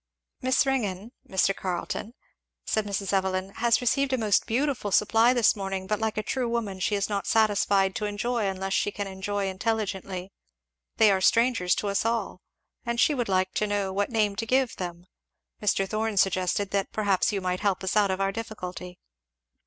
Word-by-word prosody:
"Miss 260 +2 +2
Ringgan, 220 -5 -2 0.2
Mr. 190 +1 +2
Carleton," 190 +5 -4 0.5
said 215 -1 0
Mrs. 200 -1 -2
Evelyn, 190 0 0
"has 235 +1 +2
received 270 +3 +1
a - - +2
most 215 -4 +2
beautiful 255 -2 0
supply 225 +4 +4
this 240 -3 +4
morning; 195 -2 -4
but 210 +2 -1
like 220 -1 -2
a 215 - 0
true 250 +2 -1
woman 220 -5 -2
she 205 +3 0
is 200 -1 0
not 200 -2 -3
satisfied 200 -3 +3
to 215 - -2
enjoy 215 +2 -1
unless 195 0 -3
she 205 - +1
can 205 0 -4
enjoy 195 +1 -3
intelligently 195 -2 -3 0.7
they 215 -2 +6
are 190 -1 +1
strangers 230 -3 +3
to 210 - -3
us 200 0 0
all, 225 -5 -2 0.4
and 235 0 -2
she 300 - +4
would 245 -6 -2
like 185 0 +1
to 210 - 0
know 200 -2 -1
what 205 +1 0
name 215 -4 +1
to 225 - -3
give 260 0 +2
them 175 -1 -6 0.6
Mr. 195 -2 +1
Thorn 215 0 -2
suggested 190 +1 +1
that 200 -1 -1
perhaps 200 -3 +1
you 200 - -1
might 185 -1 -2
help 200 -3 0
us 190 - -1
out 205 -2 +4
of 190 0 -1
our 195 0 +1
difficulty." 185 -5 -7
205 Hz, 185 wpm, -26 LUFS, 190-225 Hz, 0.7 s, they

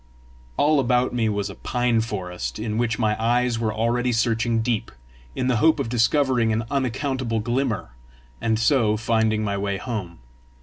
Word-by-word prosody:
All 150 0 +3
about 125 -1 +1
me 115 -3 +1
was 100 -1 -2
a - - -14
pine 120 -2 +1
forest, 95 -5 -4
in 110 0 -3
which 115 -2 0
my 110 -2 +1
eyes 120 0 +1
were 110 -2 0
already 120 +3 0
searching 115 0 +1
deep, 115 -2 -1 0.4
in 130 - -1
the 125 -2 +2
hope 160 +6 +4
of 135 - -2
discovering 120 0 +2
an 110 +1 -1
unaccountable 130 -3 -1
glimmer, 120 - -1 0.5
and 110 -1 +1
so 115 -3 +2
finding 110 -1 +1
my 100 -1 -1
way 100 0 -1
home. 100 -7 -5
115 Hz, 165 wpm, -23 LUFS, 110-125 Hz, 0.5 s, hope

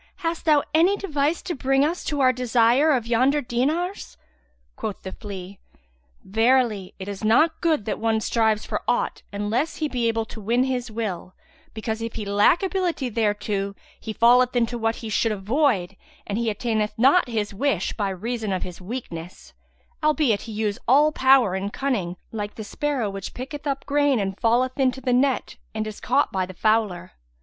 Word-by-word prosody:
Hast 330 0 -2
thou 300 -3 +4
any 350 +6 +4
device 310 -4 -1
to 355 - -3
bring 270 0 +2
us 335 +4 -2
to 290 -2 -1
our 255 -1 +5
desire 250 +3 +3
of 250 -5 +1
yonder 255 +5 +2
dinars? 300 +10 -2 0.6
Quoth 205 - -5
the 190 - -6
flea, 195 -2 -8 0.6
"Verily, 225 -2 +1
it 190 - -7
is 200 0 -6
not 310 +10 +3
good 315 -10 +1
that 215 - -3
one 225 0 +1
strives 220 -1 +1
for - - -3
aught, - - 0
unless 210 +9 -1
he 310 - -1
be 245 -4 -1
able 225 -1 0
to 220 - -10
win 235 +5 +2
his 255 -2 -2
will; 210 -5 -5 0.4
because, 220 0 -3
if 230 0 -5
he 215 - -4
lack 205 - +3
ability 360 -8 -1
thereto, 205 -2 -1 0.2
he 220 - -6
falleth 245 +3 +4
into 235 -1 +2
that - - -9
which 225 0 0
he 225 - -5
should 225 +2 +1
avoid 210 - 0 0.3
and 205 +2 -2
he 235 -1 0
attaineth 215 -1 -1
not 270 +9 +5
his 215 -3 -2
wish 205 -4 0
by 205 -3 -1
reason 215 +3 -3
of 185 - -1
his 180 0 -8
weakness, 180 -5 -7 0.5
albeit 295 -8 +2
he - - -5
use 210 -1 -2
all 290 +5 +5
power 260 -8 +4
of 195 +2 -3
cunning, 205 -11 -2
like 210 -2 -5
the 220 - -6
sparrow 275 +1 -2
which 195 -1 -6
picketh 285 +4 -6
up 275 -1 -2
grain 285 -3 +2
and 195 -1 -3
falleth 250 +4 +2
into 265 -1 +2
the 250 -1 0
net 260 +1 +1 0.2
and 215 0 -1
is 215 -1 -7
caught - - +1
by 190 -1 0
the 185 0 -7
fowler. 210 -4 0
230 Hz, 185 wpm, -24 LUFS, 205-270 Hz, 0.6 s, our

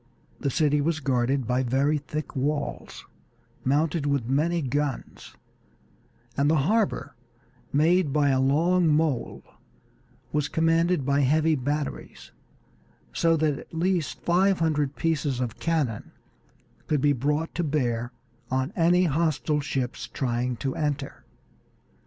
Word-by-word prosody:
The 140 - -1
city 150 +1 +2
was 155 +1 0
guarded 130 -1 0
by 125 +2 +1
very 135 +4 +1
thick 150 +2 -6
walls, 145 +2 -3 0.6
mounted 150 +2 +1
with 140 -5 0
many 160 +5 +1
guns, 140 +1 -3 1.0
and 140 +1 +2
the 160 - +3
harbor, 215 +2 0 0.6
made 160 +2 +3
by 145 0 +2
a 130 -1 +2
long 165 +6 +3
mole, 150 -4 0 0.9
was 150 -1 0
commanded 165 -1 +2
by 140 +1 +2
heavy 155 +4 +3
batteries, 145 +1 -4 0.8
so 165 -1 +2
that 150 -2 0
at - - -14
least 175 -2 -1
five 185 +2 +3
hundred 150 -4 0
pieces 150 -5 -1
of 120 -3 -3
cannon 150 -10 -1 0.8
could 150 -3 +1
be 145 +1 +4
brought 150 +5 -1
to 175 - -1
bear 120 -6 -1 0.4
on 130 +6 -1
any 175 0 +4
hostile 155 -2 +1
ships 130 -3 -3
trying 125 -1 -2
to 135 +2 -3
enter. 145 -2 -3
150 Hz, 125 wpm, -26 LUFS, 135-165 Hz, 1.0 s, be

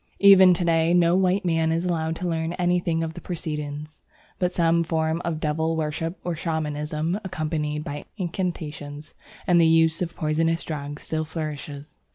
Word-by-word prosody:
Even 190 -2 +8
to 175 - -1
day 165 0 +3
no 170 0 +4
white 190 +1 +2
man 165 -2 +2
is 165 +2 0
allowed 165 -2 -1
to 180 +2 -3
learn 165 0 -1
anything 175 -2 +1
of 160 0 -4
the - - -9
proceedings, 150 -3 -5 0.4
but 180 -1 +1
some 170 -1 +2
form 160 0 -1
of 165 -2 -2
devil 160 +1 0
worship 160 +2 -2
or 175 -1 -2
Shamanism, 155 +1 -2
accompanied 155 -4 -2
by 145 0 -6
incantations 155 -5 -4 0.3
and 175 -1 +5
the 165 - +5
use 160 0 +4
of 170 -1 -3
poisonous 165 +2 0
drugs, 145 -1 -6
still 155 0 -2
flourishes. 150 -2 -6
160 Hz, 165 wpm, -24 LUFS, 155-175 Hz, 0.4 s, Even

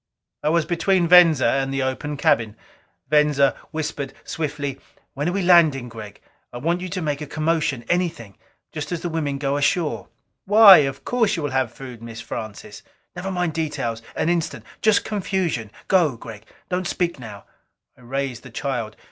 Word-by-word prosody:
I 150 - 0
was 165 0 +2
between 175 +2 +1
Venza 165 -5 +6
and 135 +3 +1
the 135 0 -1
open 140 +3 -3
cabin. 115 -5 +1 0.5
Venza 150 -1 +3
whispered 150 -3 -4
swiftly, 145 -3 -4 0.3
"When 145 +5 -1
we 195 +2 -1
are - - -2
landing, 155 -8 +4
Gregg, 110 -3 -10 0.3
I - - -7
want 170 +7 -1
you 185 - -5
to 185 -1 -4
make 145 -1 -2
a 150 - -5
commotion 155 -5 -1
anything 165 - -2 0.4
just 150 0 -6
as 175 - -3
the 175 - -3
women 150 -4 -2
go 140 0 -1
ashore." 145 - 0 0.4
"Why? 205 -2 +9
Of 135 -2 -1
course 225 -4 +1
you 165 - -4
will 145 - -2
have 130 -3 0
food, 125 -2 -10
Mrs. 115 0 -9
Francis." 110 -2 -7 0.3
"Never 180 +2 -4
mind 180 -3 -1
details! 145 -8 -3
An - - -1
instant 170 -1 -1 0.2
just 215 -2 +3
confusion. 185 - -2 0.2
Go, 165 -10 +3
Gregg 110 -2 -11 0.2
don't 180 -1 -2
speak 170 -5 -1
now!" 105 -5 -9 0.5
I - - -21
raised 130 -1 -4
the 130 - -12
child. 120 -3 -4
150 Hz, 175 wpm, -22 LUFS, 130-175 Hz, 0.5 s, Why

